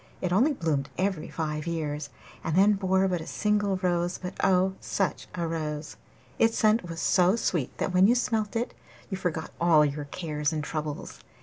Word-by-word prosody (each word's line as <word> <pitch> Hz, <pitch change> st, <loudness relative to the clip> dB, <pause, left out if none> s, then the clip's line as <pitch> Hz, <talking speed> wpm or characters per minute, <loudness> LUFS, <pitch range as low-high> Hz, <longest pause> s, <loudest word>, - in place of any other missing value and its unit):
It 180 Hz, -1 st, -1 dB
only 250 Hz, +11 st, +4 dB
bloomed 150 Hz, -, -1 dB
every 185 Hz, -4 st, -1 dB
five 150 Hz, -1 st, -3 dB
years, 150 Hz, -3 st, -3 dB, 0.3 s
and 165 Hz, -, -1 dB
then 200 Hz, +3 st, +6 dB
bore 190 Hz, -1 st, +2 dB
but 180 Hz, -3 st, -1 dB
a 160 Hz, -, -8 dB
single 205 Hz, -2 st, +1 dB
rose, 175 Hz, 0 st, +1 dB
but 180 Hz, -1 st, -6 dB
oh, 190 Hz, 0 st, +3 dB
such 195 Hz, -3 st, -2 dB
a 170 Hz, -2 st, -1 dB
rose! 155 Hz, -2 st, -4 dB, 0.4 s
Its 225 Hz, 0 st, +3 dB
scent 215 Hz, -4 st, +3 dB
was 165 Hz, 0 st, -5 dB
so 180 Hz, +3 st, +4 dB
sweet 170 Hz, -, -1 dB
that 185 Hz, -, -1 dB
when 185 Hz, +2 st, +6 dB
you 240 Hz, -, +4 dB
smelt 225 Hz, -3 st, 0 dB
it 235 Hz, +2 st, -1 dB, 0.4 s
you 190 Hz, -, -1 dB
forgot 170 Hz, -4 st, -3 dB
all 160 Hz, -3 st, +6 dB
your 145 Hz, 0 st, -3 dB
cares 150 Hz, -1 st, -2 dB
and 155 Hz, -2 st, -2 dB
troubles. 150 Hz, -1 st, -5 dB
175 Hz, 185 wpm, -27 LUFS, 155-195 Hz, 0.4 s, then